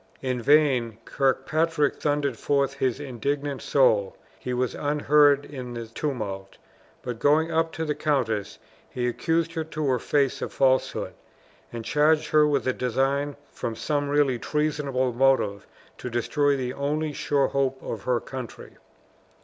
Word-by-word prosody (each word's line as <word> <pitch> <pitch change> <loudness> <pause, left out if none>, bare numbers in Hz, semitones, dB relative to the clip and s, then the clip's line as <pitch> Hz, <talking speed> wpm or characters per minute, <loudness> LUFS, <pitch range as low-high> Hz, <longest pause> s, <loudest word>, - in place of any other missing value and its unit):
In 125 -2 -1
vain 130 -5 +3
Kirkpatrick 150 +3 +1
thundered 145 -3 0
forth 140 +3 0
his 130 -2 -1
indignant 140 +1 -3
soul; 110 -8 +2 0.2
he 125 - -5
was 125 0 -1
unheard 145 -1 +3
in 125 -4 -7
the 115 -1 -5
tumult; 110 -6 -5 0.5
but 120 -2 -5
going 155 +4 +3
up 165 0 +1
to 160 - -3
the 150 - 0
countess, 130 -9 -1 0.3
he 125 -1 -2
accused 165 +6 0
her 160 - -2
to 155 -1 -4
her 130 -2 +1
face 140 0 0
of - - -4
falsehood, 130 -1 +1 0.6
and 115 -2 -6
charged 150 +3 +2
her 150 0 +5
with 140 -3 0
a 130 - +2
design 135 +4 0 0.2
from 115 - -4
some 145 +1 -1
really 140 -4 +2
treasonable 140 -4 -1
motive 120 -6 +2 0.3
to 125 - -5
destroy 140 +4 +1
the 125 -1 -3
only 150 +2 -2
sure 140 -1 +1
hope 135 -1 0
of 110 - -5
her 125 -2 +2
country. 130 -2 -9
140 Hz, 150 wpm, -25 LUFS, 125-150 Hz, 0.6 s, her